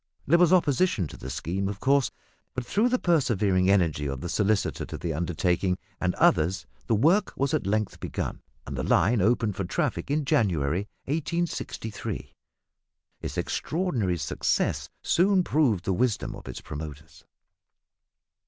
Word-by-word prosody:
There 170 +5 +4
was 175 -1 +5
opposition 165 - +3
to - - -10
the 65 - -8
scheme, 95 +8 -2
of 100 -1 -5
course; 140 +2 +3 0.5
but, 130 -1 -3
through 215 - +2
the 255 - +2
persevering 105 - +2
energy 80 -7 +2
of 70 -1 -4
the 85 - -4
solicitor 105 +1 +1
to 80 - -6
the 80 +3 -3
undertaking 90 +3 0 0.2
and 90 -1 0
others, 90 +5 +3 0.2
the 115 - +3
work 170 - +3
was 140 0 0
at 95 - 0
length 105 +1 -1
begun, - - -4 0.2
and 70 - -6
the 65 - -2
line 105 - +3
opened 110 0 +2
for 100 - -2
traffic 85 - -2
in 145 +1 0
January 90 - +1 0.2
1863. 155 - -3 0.9
Its - - -5
extraordinary 125 - -1
success 75 - -1
soon 185 +1 +3
proved 125 - +1
the 95 - +1
wisdom 115 +2 0
of - - -12
its - - -6
promoters. 75 0 -8
105 Hz, 150 wpm, -27 LUFS, 90-145 Hz, 0.9 s, was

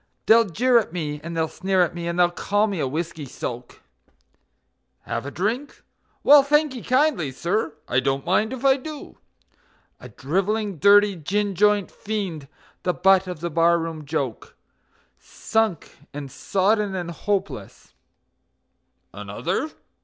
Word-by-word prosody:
They'll 230 +1 +6
jeer 235 +6 +3
at 215 - -5
me, 150 -4 -4
and 170 0 -6
they'll 160 0 +1
sneer 190 +2 +1
at 175 - -2
me, 170 -1 -5
and 170 0 -3
they'll 175 -1 +4
call 205 +4 +1
me 200 -5 -3
a 135 - 0
whiskey 155 +1 -4
soak; 120 0 -7 1.2
("Have - - -4
a - - -3
drink? 225 - -3 0.4
Well, 290 0 +8
thankee 285 -2 +1
kindly, 255 - +1
sir, 170 +4 -2
I 125 - +2
don't 135 +1 -1
mind 210 +5 +1
if 260 0 -6
I 270 0 +5
do.") 300 +2 -9 0.8
A - - -11
drivelling, 195 +4 -2
dirty, 205 +1 +6
gin 200 +5 -1
joint 210 +1 +2
fiend, 190 -9 -4 0.3
the 180 - -1
butt 190 0 +4
of 180 -4 -6
the 170 0 -3
bar 170 +2 +4
room 165 -2 -5
joke; 140 -6 -4 0.6
Sunk 220 -7 -2 0.2
and 140 -2 -6
sodden 200 - 0
and 175 -2 -4
hopeless 200 +3 -4 1.2
"Another? 315 - -3
185 Hz, 145 wpm, -23 LUFS, 165-215 Hz, 1.2 s, Well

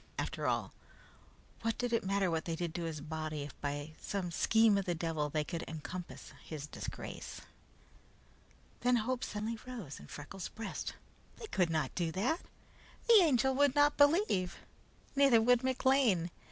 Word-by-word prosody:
After - - -2
all, - - 0 0.9
what 225 0 -1
did 245 -1 -1
it 230 - +2
matter 195 -1 +1
what 160 -1 -1
they 165 - -2
did 170 -1 -3
to 170 0 -3
his 155 -3 -4
body 155 -1 -4
if 145 - -8
by 145 +1 -3
some 190 -4 -3
scheme 220 +5 +4
of 195 - -3
the 175 - 0
devil 160 -3 -1
they 150 +1 0
could 170 +2 -4
encompass 160 +3 -7
his 150 -3 -6
disgrace? - - -7 1.4
Then 250 0 +3
hope 245 +2 0
suddenly 220 +2 -3
rose 220 - -7
high - - -11
in - - -15
Freckles' 155 +5 -7
breast. 225 - -5 0.4
They - - -7
could 180 - +1
not 155 -5 0
do 170 -3 -1
that! 250 - 0 0.7
The 460 -2 +9
Angel 265 -5 +3
would 285 0 +3
not 290 0 +5
believe. 285 - +3 0.6
Neither 275 -4 +6
would 245 +2 +4
McLean. 260 -9 +3
195 Hz, 165 wpm, -34 LUFS, 160-250 Hz, 1.4 s, The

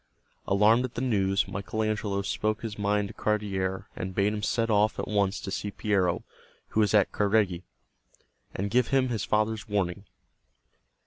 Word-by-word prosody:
Alarmed 105 +5 +4
at 125 -1 -5
the 120 - -2
news 100 -6 +1
Michael 100 +3 -3
Angelo 105 -2 -1
spoke 110 +3 -1
his 110 -2 -4
mind 105 0 +1
to - - -9
Cardiere 95 -3 -1
and 95 +1 -5
bade 100 +1 +2
him 105 - -3
set 115 +2 0
off 105 +1 +3
at - - -3
once 100 -1 +1
to 95 - -6
see 105 +1 -3
Piero, 95 -4 0 0.5
who - - -1
was 105 -1 +3
at 100 -3 +4
Careggi, 100 -4 +1 0.9
and 100 +2 -2
give 125 0 +3
him 135 -2 +2
his 115 -2 -2
father's 110 0 0
warning. 100 -1 -1
105 Hz, 170 wpm, -28 LUFS, 100-110 Hz, 0.9 s, Alarmed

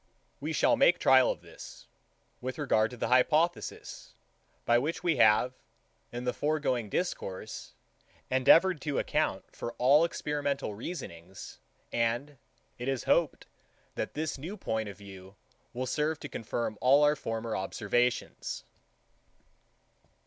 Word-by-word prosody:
We - - -3
shall - - +3
make - - +5
trial - - +5
of - - -3
this, - - -12 0.6
with 130 +1 -4
regard 115 -7 +2
to 125 - -10
the 115 - -2
hypothesis, 155 +7 +1 0.5
by 120 0 +4
which 165 +7 -3
we 165 -5 +2
have, 115 +2 +4 0.6
in 120 +1 -5
the 125 0 -1
foregoing 140 -7 -1
discourse, 110 - -4 0.5
endeavoured 150 +6 +5
to 145 -3 -2
account - - -1
for 120 - -5
all 140 +5 +5
experimental 145 -7 -2
reasonings; 95 - -8 0.3
and 120 +4 -1 0.4
it 125 - -4
is 135 -2 -1
hoped, 170 -4 +1 0.5
that - - -4
this 155 -2 -3
new 180 +9 -6
point 110 - -2
of 100 - -10
view 95 -1 -12 0.4
will 130 +2 -3
serve 150 +4 -1
to 145 - -5
confirm 115 -2 -4
all 140 +3 +5
our 150 0 +4
former 115 -4 -4
observations. 110 +5 -1
130 Hz, 130 wpm, -30 LUFS, 115-150 Hz, 0.6 s, make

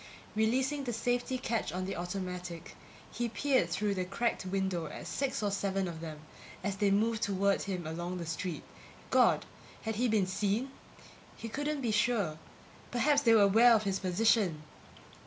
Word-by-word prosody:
Releasing 260 +6 +1
the 240 - -2
safety 245 +3 0
catch 230 -8 -2
on 185 +2 -3
the 195 - -3
automatic, 180 -1 -5 0.4
he 240 +1 -2
peered 255 -4 +1
through 200 +4 0
the 185 -1 -1
cracked 195 +6 -1
window 190 -3 -1
at - - -8
six 270 -5 -2
or 205 - +1
seven 195 -1 -1
of 165 -2 -6
them, 155 -2 -7 0.4
as 200 0 -2
they 205 0 +3
moved 220 +3 +2
toward 200 -1 +1
him 185 -3 -3
along 175 +3 -4
the 170 - -5
street. 165 +1 -4 0.5
God! - - +4 0.4
Had 220 -2 -2
he 245 +2 +2
been 215 -4 +2
seen? 205 +7 -1 0.7
He 230 - -6
couldn't 290 +4 -2
be 235 -4 0
sure. 210 -7 +1 0.5
Perhaps 285 +4 +3
they 230 -4 +5
were 210 - +7
aware 225 +4 +7
of 215 - +1
his 195 -2 -1
position! 185 -3 +2
200 Hz, 170 wpm, -32 LUFS, 185-235 Hz, 0.7 s, were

